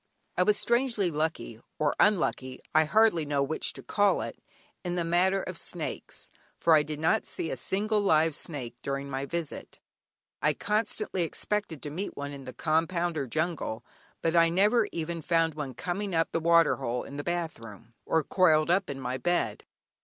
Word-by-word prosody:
I - - +2
was 205 +3 +4
strangely 235 -6 +1
lucky 155 -7 -2 0.2
(or 150 -1 +1
unlucky, 135 -10 +2
I 155 0 +5
hardly 215 -1 +4
know 145 -1 0
which 155 +3 -1
to - - -10
call 205 -1 +2
it) - - -7 0.4
in 175 -1 -2
the 175 - 0
matter 185 +3 +2
of - - -3
snakes, - - -5 0.3
for 165 - +4
I 155 - +7
did 150 0 -5
not 160 +1 +2
see 165 - -2
a - - -1
single 210 +2 0
live 160 -4 +3
snake 130 -6 -4
during 140 0 -3
my 135 +1 -3
visit. 170 -1 -5 0.6
I 150 -1 +2
constantly 210 -2 -1
expected 175 -1 -3
to 145 - -5
meet 185 +7 -5
one 145 0 -4
in 140 -2 -9
the 130 - -7
compound 170 +2 0
or 140 -3 -2
jungle, 155 -6 -2 0.4
but 165 0 +1
I 165 0 +6
never 205 +6 +3
even 165 0 -3
found 165 0 +2
one 145 -4 -5
coming 190 +1 -3
up 165 0 +1
the - - 0
water 170 0 +4
hole 125 -2 -2
in 140 - -9
the 145 - -3
bath 175 -3 -2
room, 115 +1 -12
or 160 - +1
coiled 160 -2 +3
up 190 +2 +2
in 135 -1 -4
my 130 0 -3
bed. 175 +7 0
165 Hz, 185 wpm, -28 LUFS, 145-180 Hz, 0.6 s, I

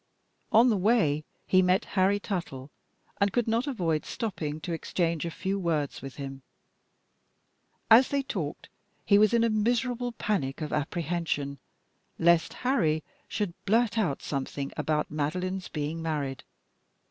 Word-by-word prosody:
On 235 +3 +6
the 210 - +2
way 180 -8 +2 0.2
he 185 - +4
met 180 +1 +2
Harry 195 +1 +3
Tuttle, 160 - -5 0.5
and 200 0 +3
could 240 +2 0
not 230 +5 +1
avoid 170 - 0
stopping 155 -9 -4
to 170 - -3
exchange 165 0 -1
a - - -1
few 190 +4 -2
words 160 -6 -1
with 135 -1 -8
him.. 135 -1 -7 1.5
As 240 +4 +9
they 280 -1 0
talked, 165 - -4 0.4
he 200 -1 +5
was 215 -1 +5
in 235 -1 +3
a 230 - +3
miserable 240 +3 0
panic 180 -12 -1
of 155 -2 -4
apprehension 155 -2 -2 0.6
lest 170 -1 +3
Harry 160 - +2 0.2
should 205 -5 -2
blurt 225 +2 +3
out 185 -12 0
something 140 0 -3
about 150 -1 -1
Madeline's 180 +5 -2
being 155 +2 -3
married. 145 -5 -3
175 Hz, 140 wpm, -28 LUFS, 150-215 Hz, 1.5 s, As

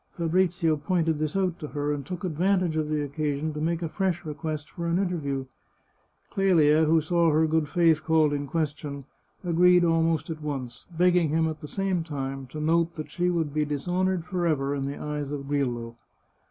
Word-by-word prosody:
Fabrizio 170 -1 +1
pointed 160 -1 0
this 155 +1 -2
out 185 -3 0
to 150 - -5
her, 145 0 -2
and 145 -1 -4
took 180 +6 -6
advantage 180 0 +1
of 155 -1 -1
the 150 -1 0
occasion 145 +1 -2
to 150 - -5
make 170 +2 -1
a - - 0
fresh 175 0 -1
request 155 0 -4
for 170 -1 -4
an 170 +1 +1
interview. 150 -8 -1 0.9
Clelia, 160 -5 +4
who 160 +1 +4
saw 170 +1 +2
her 155 +1 +3
good 160 -1 +1
faith 165 -2 +3
called 160 -2 +3
in 145 0 -2
question, 145 -2 -3 0.4
agreed 180 +1 +5
almost 165 -2 +1
at 155 -1 -6
once, 135 -5 -5
begging 175 -1 +3
him, 160 +2 +2
at 155 -1 -5
the 150 - -7
same 190 0 -1
time, 135 -3 -5
to 150 +4 -7
note 165 +2 +1
that 155 - -7
she 180 0 0
would 165 -5 -1
be 155 0 +1
dishonoured 175 +5 -1
forever 160 -7 0
in 140 -1 -2
the 140 +1 -4
eyes 150 -1 -4
of 140 -2 -5
Grillo. 120 -5 -2
160 Hz, 190 wpm, -26 LUFS, 145-175 Hz, 0.9 s, agreed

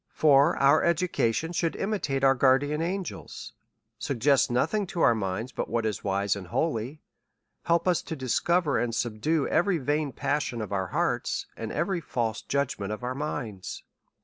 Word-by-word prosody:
For 145 +1 +5
our 140 +3 +4
education 170 -4 +1
should 170 -1 0
imitate 185 -10 -2
our 135 0 +6
guardian 135 +4 +2
an 185 +3 -1
gels, - - -8 0.5
suggest 135 0 +2
nothing 165 - 0
to 175 -2 -3
our 120 - +6
minds 110 +3 -3
but - - -4
what 115 -1 -1
is 110 -2 -2
wise 100 0 0
and 95 -3 -8
holy; 135 - -2 0.6
help 170 +1 +2
us 180 -2 +3
to 160 - -6
discover 150 +4 +1
and 115 -1 -1
subdue 120 +7 0
every 180 +2 +2
vain 145 0 -1
passion 140 -3 -2
of 105 -2 -4
our 95 -1 -1
hearts, - - -1
and 115 -1 -5
every 175 +2 -1
false 115 -7 -2
judgment 125 -8 -2
of 105 +2 -5
our 125 +1 -2
minds. 125 -9 -5
140 Hz, 165 wpm, -27 LUFS, 115-160 Hz, 0.6 s, our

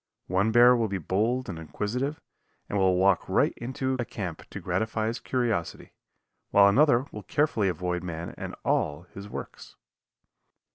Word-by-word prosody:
One 95 +4 +1
bear 120 +2 +7
will 115 -2 +1
be 100 -1 -2
bold 110 +9 0
and 85 -4 -5
inquisitive, 125 - -3 0.5
and 100 - -1
will 95 -1 +3
walk 95 0 +2
right - - +2
into 130 +2 -3
a - - +1
camp 95 -8 -6
to - - -7
gratify 110 0 -1
his 115 +2 -2
curiosity, 115 -9 -2 0.6
while 100 0 +6
another 130 +3 +4
will 105 - -7
carefully 110 -7 +1
avoid 90 0 -2
man 85 -1 -5
and - - -6
all 75 +3 0
his 100 +1 -9
works. - - -8
105 Hz, 155 wpm, -27 LUFS, 90-120 Hz, 0.6 s, bear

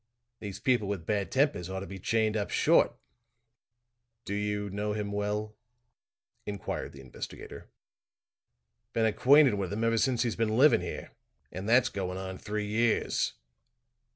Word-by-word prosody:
These 100 -3 -6
people 125 -6 +2
with 95 -5 -3
bad 100 -1 -1
tempers 130 - +1
ought 95 0 -4
to - - -5
be 95 -1 -8
chained 110 +2 +1
up 105 -2 -1
short." - - +4 1.3
"Do 100 - -4
you 105 0 -1
know 105 +1 -2
him 105 -1 -3
well?" 105 +1 -2 0.9
inquired 100 -2 -5
the 70 - -11
investigator. 65 -2 -9 1.2
"Been 115 - +2
acquainted 135 +5 +5
with 100 -2 -2
him 110 +3 -2
ever 115 0 +2
since 125 +1 +2
he's 120 -3 -1
been 110 -1 0
living 140 - +6
here 90 - -6 0.4
and 95 +4 -5
that's 120 +1 +5
going 95 -2 -4
on 95 0 -6
three 105 0 -3
years." 110 +2 +1
105 Hz, 150 wpm, -29 LUFS, 100-115 Hz, 1.3 s, living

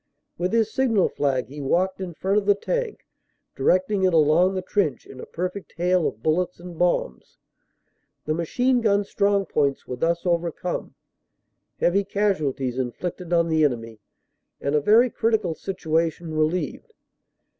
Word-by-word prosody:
With 180 +2 -2
his 225 -1 +1
signal 230 -7 +2
flag 135 -3 0
he 145 +1 -8
walked 185 +8 0
in 175 -3 -5
front 195 +5 +1
of 200 - -8
the 205 - +5
tank, 485 - -3 0.5
directing 185 +2 +2
it 185 -2 +3
along 165 +5 +4
the 185 - -2
trench 180 - -1
in 130 - -12
a - - -8
perfect 185 +3 -5
hail 180 -1 +2
of 110 - -7
bullets 175 +3 0
and 175 0 -9
bombs. 170 - -1 0.9
The 155 - 0
machine 245 +10 +1
gun 205 -2 +2
strong 200 0 +1
points 140 -5 0
were 125 - -5
thus 170 +6 0
overcome, 170 0 -2 0.8
heavy 195 +3 +2
casualties 155 -11 -1
inflicted 170 +8 -4
on 170 -1 +3
the 160 -1 +2
enemy, 115 -5 -1 0.6
and 140 - -2
a 150 - +3
very 225 - +5
critical 220 -6 0
situation 165 -2 -2
relieved. 165 - -1
175 Hz, 150 wpm, -24 LUFS, 155-200 Hz, 0.9 s, the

